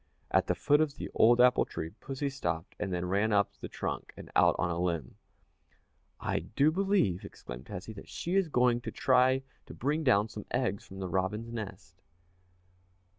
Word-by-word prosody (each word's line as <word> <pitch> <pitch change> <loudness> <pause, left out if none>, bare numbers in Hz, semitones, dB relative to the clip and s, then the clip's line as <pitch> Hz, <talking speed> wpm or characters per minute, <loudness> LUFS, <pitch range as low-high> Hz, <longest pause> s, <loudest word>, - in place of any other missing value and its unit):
At - - +3
the - - +1
foot 145 +1 +3
of 150 -3 0
the - - -6
old 120 +2 +5
apple 125 0 +6
tree 80 - -6
pussy 135 +5 -4
stopped 85 - -3
and 95 - -2
then 90 0 -1
ran 100 +4 +1
up 100 -1 +2
the - - -7
trunk - - -4
and - - -10
out - - +5
on 90 - 0
a 85 - -2
limb. 85 -8 -1 1.1
"I - - -1
do 145 +7 +2
believe," 190 - +1
exclaimed - - -9
Tessie, 95 +5 -7
"that 100 - -11
she 175 - -4
is 195 -2 +3
going 125 -4 +2
to 115 -1 -5
try 130 +2 +3 0.2
to - - -9
bring 150 +4 0
down 110 -6 +4
some 105 -1 -8
eggs 120 -6 -1
from 95 - -10
the 95 -1 -3
robin's 95 +6 -2
nest." 110 -4 -7
110 Hz, 185 wpm, -31 LUFS, 95-135 Hz, 1.1 s, apple